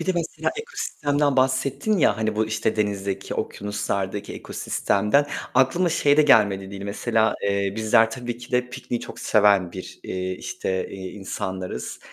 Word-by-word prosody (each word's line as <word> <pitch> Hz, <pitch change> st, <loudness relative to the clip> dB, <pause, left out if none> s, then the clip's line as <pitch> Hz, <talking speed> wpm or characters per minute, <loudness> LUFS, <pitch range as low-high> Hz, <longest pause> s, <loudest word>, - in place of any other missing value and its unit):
Bir -, -, -4 dB
de 185 Hz, -, +3 dB
mesela 170 Hz, -1 st, -1 dB
ekosistemden 145 Hz, -, -1 dB
bahsettin 130 Hz, +10 st, +1 dB
ya 110 Hz, -, +4 dB
hani 110 Hz, -1 st, -1 dB
bu 110 Hz, 0 st, +2 dB
işte 110 Hz, 0 st, -1 dB
denizdeki, 100 Hz, -2 st, -2 dB
okyanuslardaki 100 Hz, 0 st, -3 dB
ekosistemden. 105 Hz, +9 st, +1 dB, 0.3 s
Aklıma 135 Hz, +8 st, +3 dB
şey 145 Hz, -2 st, +3 dB
de 155 Hz, -, +7 dB
gelmedi 100 Hz, -9 st, +4 dB
değil 100 Hz, 0 st, -7 dB
mesela, 110 Hz, +2 st, +1 dB
eee, 100 Hz, -1 st, 0 dB
bizler 110 Hz, +1 st, +4 dB
tabii 120 Hz, 0 st, -5 dB
ki 120 Hz, +1 st, -12 dB
de 125 Hz, 0 st, +1 dB
pikniği 125 Hz, -2 st, -4 dB
çok -, -, -9 dB
seven 100 Hz, -5 st, +3 dB
bir, 95 Hz, -, -9 dB
eee, 95 Hz, 0 st, -3 dB
işte, 95 Hz, 0 st, -3 dB
eee, 95 Hz, -1 st, -6 dB
insanlarız. 95 Hz, -7 st, -5 dB
110 Hz, 155 wpm, -24 LUFS, 100-130 Hz, 0.3 s, de